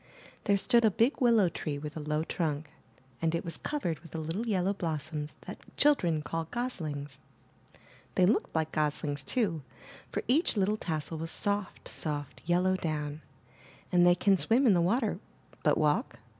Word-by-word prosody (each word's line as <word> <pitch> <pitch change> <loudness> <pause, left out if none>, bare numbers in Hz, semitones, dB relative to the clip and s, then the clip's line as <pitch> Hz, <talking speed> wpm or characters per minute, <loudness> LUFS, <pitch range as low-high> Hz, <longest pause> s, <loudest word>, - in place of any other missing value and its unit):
There 200 -2 +4
stood 235 +3 +4
a 220 - +6
big 230 +8 +1
willow 230 -6 +5
tree 155 -3 -3
with 150 +1 -7
a - - -4
low 150 +1 -1
trunk, 155 -3 -2 0.5
and 165 0 +1
it 170 - -3
was 165 - -3
covered 295 - -3
IN - - -5
THE - - 0
NURSERY 160 - -3
With 165 -2 -14
the - - -3 0.2
little 235 +2 -2
yellow 190 0 +1
blossoms 155 -4 -3
that - - -8 0.2
children 175 - +3
call 165 +2 -3
goslings. 155 - -4 1.0
They 185 - +5
looked 205 -2 +1
like 160 -1 0
goslings, 145 -1 -1
too, 180 - 0 0.5
for - - -3
each 275 0 +2
little 205 +2 +2
tassel 160 -3 -3
was 165 +1 -4
soft, 200 +1 -2
soft 145 -3 -4
yellow 180 +2 +3
down, 150 -3 -3 0.7
and 175 -1 +5
they 175 0 +6
can 195 +1 +3
swim 245 +5 +3
in 220 - +6
the 175 - +3
water, 220 +6 +1 0.4
but - - +3
walk? 150 -5 +1
170 Hz, 180 wpm, -30 LUFS, 150-205 Hz, 1.0 s, a